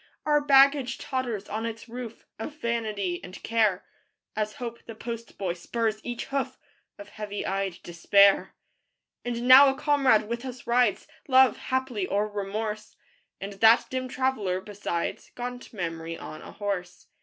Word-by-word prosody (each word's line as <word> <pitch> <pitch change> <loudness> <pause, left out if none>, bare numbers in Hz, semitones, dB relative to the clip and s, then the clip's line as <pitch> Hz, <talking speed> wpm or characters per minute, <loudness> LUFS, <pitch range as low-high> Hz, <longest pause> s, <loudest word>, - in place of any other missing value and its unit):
Our 295 -1 +3
baggage 275 -2 +5
totters 245 -6 -3
on 220 +1 -3
its 225 +1 -7
roof, 235 -1 -8
Of 290 +7 -6
Vanity 215 - -2
and 185 - -9
Care, 215 -4 +1 0.5
As 215 0 -2
Hope, 235 -1 -7
the 225 - -8
post 230 0 -7
boy, 185 -3 -1
spurs 215 +4 -2
each 240 -1 -4
hoof, 275 -1 -3 0.4
Or 205 - -9
heavy 205 0 -6
eyed 195 -2 -2
Despair. 200 +4 +4 0.7
And 240 0 -3
now 270 +2 +10
a 270 - -1
comrade 270 -8 +3
with 235 +2 -4
us 255 -2 -8
rides, 240 -4 +2 0.2
Love, 260 -3 +6
haply, 260 -7 -2
or 205 +1 0
Remorse; 210 +1 -4 0.4
And 200 +1 -6
that 225 +4 +5
dim 260 0 -2
traveler 250 -8 -1
besides, 190 -3 -4
Gaunt 245 0 -6
Memory 165 -4 -4
on 155 - -9
a - - -11
horse. 190 -4 -4
225 Hz, 150 wpm, -27 LUFS, 200-250 Hz, 0.7 s, now